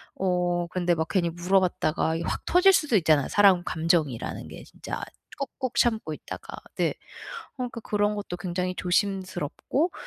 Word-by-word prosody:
어 180 Hz, -2 st, 0 dB
근데 175 Hz, -1 st, +1 dB
막 160 Hz, 0 st, -1 dB
괜히 175 Hz, -4 st, +1 dB
물어봤다가 175 Hz, -2 st, +1 dB
이게 165 Hz, -, -3 dB
확 -, -, -3 dB
터질 380 Hz, +2 st, +6 dB
수도 300 Hz, -8 st, +2 dB
있잖아요. 155 Hz, -5 st, +3 dB
사람 195 Hz, -4 st, +5 dB
감정이라는 160 Hz, -8 st, -1 dB
게 -, -, -10 dB
진짜 -, -, -7 dB, 0.4 s
꼭꼭 260 Hz, -1 st, -4 dB
참고 220 Hz, -9 st, +1 dB
있다가. -, -, -9 dB, 0.2 s
네. -, -, +2 dB
어 -, -, -4 dB, 0.7 s
그러니까 245 Hz, -2 st, -4 dB
그런 210 Hz, -1 st, 0 dB
것도 200 Hz, -3 st, -5 dB
굉장히 180 Hz, 0 st, -2 dB
조심스럽고 190 Hz, -, -1 dB
180 Hz, 340 characters per minute, -26 LUFS, 175-210 Hz, 0.7 s, 터질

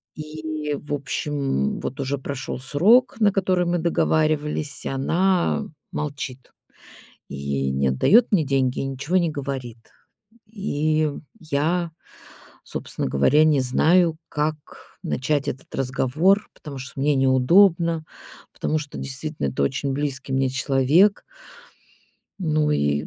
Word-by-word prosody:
И, 155 Hz, -1 st, -5 dB
в 145 Hz, -, -8 dB
общем, 140 Hz, -, -2 dB
вот 135 Hz, -, -5 dB
уже 140 Hz, +1 st, -2 dB
прошёл 135 Hz, -1 st, -5 dB
срок, 195 Hz, -, +3 dB
на 205 Hz, -2 st, +4 dB
который 185 Hz, -2 st, +1 dB
мы 175 Hz, 0 st, +1 dB
договаривались, 155 Hz, -3 st, 0 dB
и -, -, -2 dB
она 170 Hz, +7 st, +1 dB, 0.3 s
молчит. 140 Hz, -3 st, -5 dB, 0.8 s
И 70 Hz, -1 st, -2 dB
не 70 Hz, 0 st, +1 dB
отдаёт 205 Hz, -, +4 dB
мне 170 Hz, -7 st, +3 dB
деньги, 135 Hz, -2 st, 0 dB
и -, -, -2 dB
ничего 135 Hz, +6 st, -2 dB
не 170 Hz, -2 st, +1 dB
говорит. 135 Hz, -5 st, -5 dB, 0.7 s
И 155 Hz, -8 st, 0 dB, 0.3 s
я, 165 Hz, +3 st, -1 dB, 0.7 s
собственно -, -, -4 dB
говоря, 130 Hz, -, +4 dB
не 150 Hz, -3 st, +3 dB
знаю, 160 Hz, +6 st, +3 dB
как 150 Hz, +1 st, -1 dB, 0.5 s
начать 140 Hz, +2 st, -1 dB
этот 130 Hz, -, -7 dB
разговор. 140 Hz, +10 st, +1 dB
Потому 145 Hz, -3 st, -9 dB
что 130 Hz, +1 st, -7 dB
мне 145 Hz, 0 st, +2 dB
неудобно, 165 Hz, +5 st, +4 dB, 0.5 s
потому 155 Hz, -, -1 dB
что 150 Hz, -1 st, -7 dB
действительно 140 Hz, -, -3 dB
это 65 Hz, +1 st, -2 dB
очень 135 Hz, -, -1 dB
близкий 135 Hz, -1 st, -3 dB
мне 135 Hz, 0 st, +2 dB
человек. 135 Hz, +9 st, +3 dB, 1.2 s
Ну 155 Hz, -4 st, +1 dB
и 75 Hz, -, 0 dB
145 Hz, 120 wpm, -23 LUFS, 130-160 Hz, 1.2 s, на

